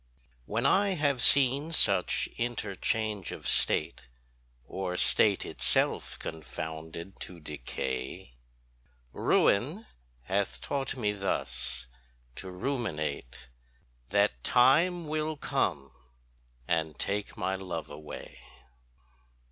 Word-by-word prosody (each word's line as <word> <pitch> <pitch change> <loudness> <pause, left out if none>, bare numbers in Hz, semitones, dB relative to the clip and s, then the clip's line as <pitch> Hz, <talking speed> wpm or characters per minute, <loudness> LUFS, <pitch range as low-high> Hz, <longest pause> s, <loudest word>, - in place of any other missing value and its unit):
When 110 +3 -1
I 200 -1 +4
have 145 -5 +1
seen 140 +5 +5
such 100 - +3
interchange 110 -3 -2
of - - -6
State, - - +1 0.6
Or 90 +4 -3
state 100 +1 +4
it - - -9
self - - +2
confounded, 80 +3 -7
to 90 -2 -6
decay, 65 -4 -5 0.8
Ruin 150 - +2 0.4
hath 100 +8 -1
taught 135 -2 -2
me 105 -4 +1
thus 65 -10 -2 0.5
to 95 - -5
ruminate 90 - -3 0.6
That 100 -12 +2
Time 165 +8 +4
will 155 0 -2
come 85 - -1 0.8
and 80 -3 0
take 100 +1 -2
my 95 +1 -1
love 95 -2 -4
away. 75 +1 -9
100 Hz, 95 wpm, -30 LUFS, 80-130 Hz, 0.8 s, seen